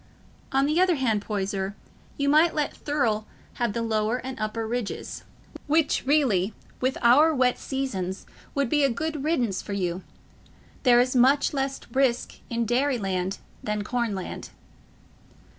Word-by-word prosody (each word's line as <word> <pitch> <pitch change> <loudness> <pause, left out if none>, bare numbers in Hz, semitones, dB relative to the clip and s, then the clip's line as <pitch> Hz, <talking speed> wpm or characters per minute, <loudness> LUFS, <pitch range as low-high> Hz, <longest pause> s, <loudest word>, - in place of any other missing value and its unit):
On 270 +1 +3
the 305 +5 +2
other 370 -2 +4
hand, 230 -7 +1
Poyser, 200 -1 -3 0.4
you 280 - 0
might 310 +4 +4
let 300 -2 -1
Thurle 230 -8 -1 0.3
have 235 -4 +1
the 230 - -2
Lower 220 +1 0
and 260 +1 -6
Upper 215 +1 -2
Ridges, 235 -2 -4 0.4
which 300 -3 +2
really, 225 -10 +2 0.2
with 260 +1 0
our 295 +7 +6
wet 255 -1 +2
seasons, 195 -9 -3 0.3
would 280 -2 +1
be 295 +4 +2
a 275 - +4
good 300 +4 -3
riddance 245 - 0
for 205 - -6
you. 180 -2 -2 0.8
There 245 -3 +6
is 255 +1 +2
much 270 +5 +4
less 270 -1 -1
risk 260 -1 +1
in 235 0 -1
dairy 255 +4 +1
land 190 -2 -2 0.2
than 210 -1 -2
corn 235 -1 -1
land." 185 - -6
245 Hz, 150 wpm, -26 LUFS, 210-280 Hz, 0.8 s, our